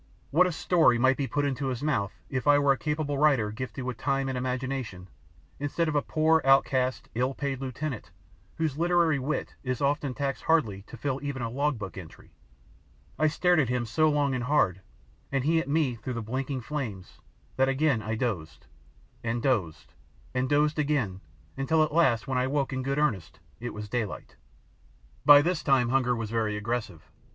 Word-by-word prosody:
What 180 +5 +5
a - - -1
story 160 -6 +3
might 130 +2 +4
be 140 0 -2
put 145 +1 0
into 135 0 -2
his 130 0 -3
mouth 115 -10 0 0.2
if 130 +1 -3
I 145 0 +7
were 140 -1 +4
a - - +3
capable 150 -2 -2
writer 135 -9 +3
gifted 125 +2 -6
with 125 -2 -4
time 135 -1 0
and 130 - -3
imagination 125 -6 -3 0.5
instead 145 +4 -1
of 155 - -1
a 145 - +3
poor 160 +2 +2
outcast, 130 -1 +2
ill 125 +3 -1
paid 135 -2 -3
lieutenant 135 -1 -5 0.5
whose 155 -3 -2
literary 170 -3 +3
wit 140 +4 -3
is 130 -2 -2
often 140 -2 0
taxed 140 -1 -3
hardly 115 -12 +2
to - - -10
fill 135 +2 -2
even 140 -3 -4
a 115 - -3
log 140 +1 0
book 100 -2 -7
entry! 85 -4 -13 0.9
I 155 - +4
stared 175 +3 +2
at 135 -6 +1
him 125 -1 0
so 155 +8 +2
long 145 -2 +1
and 125 -1 -2
hard, 105 -10 +2 0.5
and 135 -2 0
he 165 +3 +3
at 140 - -4
me 145 -4 +2
through 120 +3 -5
the 115 - -3
blinking 130 +3 -3
flames, 115 -8 -6 0.4
that 135 0 +3
again 135 -3 +1
I 110 +1 -3
dozed 85 - -3 0.6
and 115 +1 -1
dozed 100 - -1 0.4
and 130 0 0
dozed 150 +1 +2
again 130 -11 0 0.4
until 155 +4 +2
at 155 - -2
last 130 -9 +3
when 130 -1 0
I 130 - +1
woke 140 -1 -1
in 130 - -2
good 135 +2 -2
earnest 95 - -1 0.2
it 120 +1 -5
was 105 0 -7
daylight. 110 -2 -4 0.9
By 145 0 +9
this 175 -1 0
time 130 -5 +3
hunger 125 -1 +2
was 115 -2 -4
very 110 -2 0
aggressive. 105 -6 -4
135 Hz, 190 wpm, -28 LUFS, 120-145 Hz, 0.9 s, By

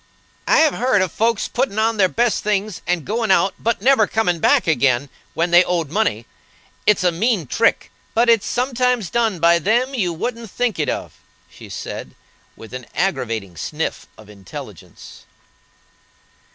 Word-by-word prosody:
"I - - +4
have 315 -2 +4
heard 240 -6 +2
of 185 - -3
folks 230 -1 0
putting 245 -4 -2
on 225 +1 +1
their 190 -2 +4
best 235 +2 0
things 210 -2 -1
and 175 -4 -1
going 220 +1 -1
out, 190 0 +3
but 230 -3 -1
never 255 -5 +4
coming 180 -7 0
back - - +3
again, 140 -4 +1 0.3
when 170 +1 0
they 175 +1 +7
owed 170 -5 -2
money. 175 - 0 0.6
It's 210 -3 +4
a 180 - +3
mean 195 0 0
trick, 225 - +1 0.2
but 235 +2 +3
it's 230 -3 +3
sometimes 250 -5 0
done 225 -5 +1
by 170 +1 +4
them 240 +8 +1
you 195 -9 0
wouldn't 230 +6 -5
think 240 -3 -2
it 150 - 0
of," - - -5 0.3
she - - -13
said, - - -7 0.4
with 115 - -13
an 125 -1 -7
aggravating 115 - -2
sniff 75 - -4
of 110 - -15
intelligence. 100 -3 -12
200 Hz, 165 wpm, -20 LUFS, 165-230 Hz, 0.6 s, they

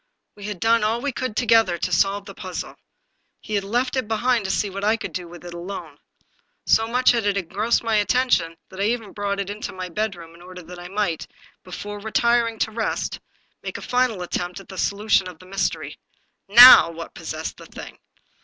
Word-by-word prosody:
We 205 -1 -11
had 205 -3 -5
done 230 +1 +3
all 220 +2 +1
we 285 +3 -2
could, 255 -3 -4
together, 225 -6 +3
to 180 - -3
solve 195 +3 +1
the 200 - -9
puzzle. 185 -2 -7 0.6
He 215 - -8
had 200 -1 +1
left 245 +6 -1
it 260 -4 -1
behind 225 0 +1
to - - -3
see 205 - 0
what 195 0 -6
I 215 +2 +2
could - - -7
do 180 -2 -5
with 175 +1 -12
it 175 - -8
alone. 175 +3 -8 0.7
So 225 0 +3
much 250 +2 +3
had 230 -4 0
it 200 -1 +1
engrossed 205 +6 0
my 225 -2 +1
attention 205 -7 +1
that 190 - -11
I 200 - +1
had 220 - +2
even 225 -4 -6
brought 200 -1 -2
it 200 0 -3
into 210 +1 -6
my 185 -1 -6
bedroom, 175 -4 -4
in 170 - -17
order 180 0 -11
that 175 +2 -11
I 175 - -8
might, 195 -4 -2 0.4
before 205 +3 -7
retiring 230 +2 +1
to 220 - 0
rest, 220 0 -3 0.4
make - - -6
a - - -9
final 245 -7 0
attempt 175 +1 -4
at 195 - -15
the 190 - -9
solution 200 -2 +1
of 180 -3 -10
the 185 - -16
mystery. 195 +1 -3 0.5
Now 240 -4 +10
what 165 0 -9
possessed 160 -1 -6
the - - -13
thing? - - -11
205 Hz, 210 wpm, -23 LUFS, 180-225 Hz, 0.7 s, Now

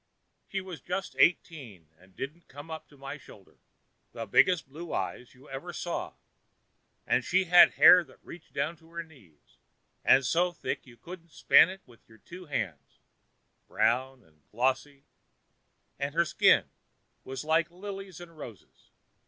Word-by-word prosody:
She 195 - -3
was 180 -7 -9
just 185 +4 -4
eighteen, 125 - 0
and 95 +1 -22
didn't 155 +6 -7
come 145 +4 -11
up 160 - -7
to 145 - -20
my 140 +2 -8
shoulder; 100 -6 -17 0.5
the 115 - -6
biggest 155 - +3
blue 160 +5 -9
eyes 125 +1 -4
you 130 +3 -18
ever 135 +6 -7
saw, 175 +1 -5 0.9
and - - +1
she 190 +1 +2
had 175 0 +7
hair 180 -1 +8
that 130 - -19
reached 170 -1 -12
down 150 +4 -2
to 160 +1 -22
her 170 0 -4
knees, 110 - -23 0.4
and 130 0 +5
so 175 +5 +1
thick - - -5
you 120 -1 -16
couldn't 170 +5 -12
span 165 - +6
it 190 +1 -9
with 120 -3 -19
your 110 - -18
two 180 +8 -12
hands—brown 120 - -4
and 75 -3 -29
glossy—and 135 +3 -5
her 170 0 +3
skin - - +4 0.6
with 135 +2 -6
like 160 +2 +1
lilies 195 0 -9
and 170 -1 -12
roses. 120 -9 -13
150 Hz, 150 wpm, -29 LUFS, 130-175 Hz, 0.9 s, hair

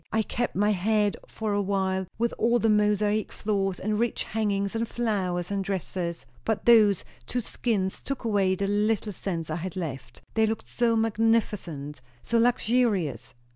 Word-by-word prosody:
I 220 0 +2
kept 240 +3 -2
my 205 +3 +3
head 210 +1 +2
for 215 -2 -3
a 205 - +2
while, 190 -1 0
with 235 +1 0
all 235 +2 +3
the 225 -1 +2
mosaic 210 0 +2
floors 195 -3 -1
and 210 +1 -1
rich 235 0 0
hangings 200 -2 -1
and 230 +1 0
flowers 190 -7 -1
and 200 -1 0
dresses, 185 -3 -3 0.2
but 220 -2 -1
those 215 -5 +6 0.2
two 250 - -1
skins 200 -4 -2
took 275 -2 -4
away 200 -4 +2
the 200 - -1
little 210 +1 +1
sense 165 -4 -4
I 155 - -1
had 180 +1 -5
left. 135 -9 -6
They 220 0 +3
looked 220 +1 -3
so 235 -1 +1
magnificent! 210 -10 0 0.2
so 230 - +2
luxurious." 230 - +1
205 Hz, 165 wpm, -27 LUFS, 190-225 Hz, 0.2 s, those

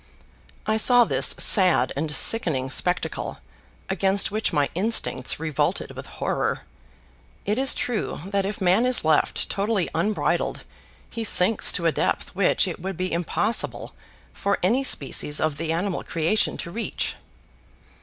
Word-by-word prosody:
I 215 0 0
saw 245 +2 +5
this - - +2
sad 180 - +4
and 155 +3 -3
sickening 135 - +3
spectacle 180 +3 -1 0.5
against 195 +1 +1
which 215 -1 -2
my 145 -4 +1
instincts 180 - 0
revolted 155 -3 -2
with - - -10
horror. - - -3 0.8
It 210 +4 -1
is 270 0 +5
true 240 -4 -3
that 200 0 -1
if 200 +1 -5
man 190 +6 +2
is 255 -9 +3
left 155 -1 +1
totally 200 -2 -2
unbridled, 210 +1 -1 0.4
he 230 - -6
sinks 210 0 +3
to 170 - -3
a 165 - +3
depth - - -2
which 195 0 +1
it 175 - -6
would 190 -1 -5
be 185 -1 -3
impossible 190 +6 -1 0.4
for 200 -1 -1
any 235 +9 +1
species 150 - +1
of 155 -2 -1
the 160 +1 -3
animal 180 +3 -2
creation 165 +6 -1
to 170 - -7
reach. 230 +5 -3
190 Hz, 145 wpm, -23 LUFS, 165-215 Hz, 0.8 s, saw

